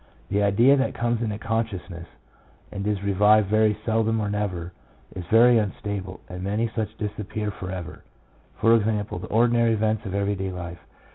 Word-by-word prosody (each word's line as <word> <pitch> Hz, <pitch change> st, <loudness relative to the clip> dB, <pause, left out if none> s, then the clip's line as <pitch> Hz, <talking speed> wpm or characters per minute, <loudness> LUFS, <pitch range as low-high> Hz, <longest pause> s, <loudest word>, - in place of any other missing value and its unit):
The 100 Hz, -, +1 dB
idea 115 Hz, +7 st, +5 dB
that 135 Hz, -, 0 dB
comes 120 Hz, 0 st, 0 dB
into 105 Hz, -3 st, -2 dB
consciousness, 105 Hz, -6 st, -4 dB, 0.6 s
and 100 Hz, +1 st, -4 dB
is 100 Hz, -2 st, -1 dB
revived 105 Hz, +1 st, +4 dB
very 110 Hz, -1 st, +3 dB
seldom 110 Hz, 0 st, +1 dB
or 105 Hz, -1 st, -2 dB
never, 90 Hz, -4 st, -3 dB, 0.4 s
is 90 Hz, -, -5 dB
very 115 Hz, +3 st, +6 dB
unstable, 100 Hz, -2 st, -4 dB
and 90 Hz, 0 st, -7 dB
many 105 Hz, +4 st, -1 dB
such 110 Hz, -1 st, -3 dB
disappear 105 Hz, 0 st, -4 dB
for 90 Hz, -1 st, -7 dB
ever 90 Hz, -3 st, -7 dB, 0.3 s
— -, -, -33 dB
for 115 Hz, -, +5 dB
example, 105 Hz, -1 st, -1 dB
the -, -, -7 dB
ordinary 115 Hz, 0 st, +3 dB
events 110 Hz, 0 st, 0 dB
of 95 Hz, -, -4 dB
every 100 Hz, 0 st, 0 dB
day 95 Hz, -1 st, -3 dB
life. 90 Hz, -1 st, -7 dB
105 Hz, 170 wpm, -24 LUFS, 95-110 Hz, 0.6 s, very